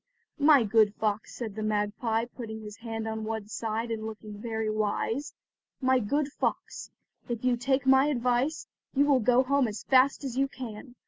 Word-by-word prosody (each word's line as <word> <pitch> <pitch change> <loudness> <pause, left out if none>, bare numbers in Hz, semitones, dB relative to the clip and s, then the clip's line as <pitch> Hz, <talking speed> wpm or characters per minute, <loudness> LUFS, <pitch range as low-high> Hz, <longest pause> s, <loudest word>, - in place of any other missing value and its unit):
"My 290 -3 +6
good 215 -1 +3
fox," 215 0 -2
said 225 -4 -5
the 215 - -5
magpie 215 +2 0
putting 220 -3 -8
his 210 0 -9
head 225 -1 -5
on 220 0 -3
one 220 -1 -4
side 225 +1 -3
and 220 -1 -3
looking 215 -1 -9
very 220 -1 -2
wise—"my 245 +4 -2
good 280 +6 0
fox, - - -3 0.4
if 235 0 -3
you 250 -1 +3
take 265 +3 0
my 265 +1 +5
advice, 255 +2 0 0.3
you 280 +2 +4
will 280 -3 +4
go 245 +3 +4
home 275 -1 +2
as 210 -1 -6
fast 265 +2 +4
as 260 -3 -4
you 275 - +3
can. 245 -1 -9
230 Hz, 175 wpm, -28 LUFS, 215-260 Hz, 0.4 s, My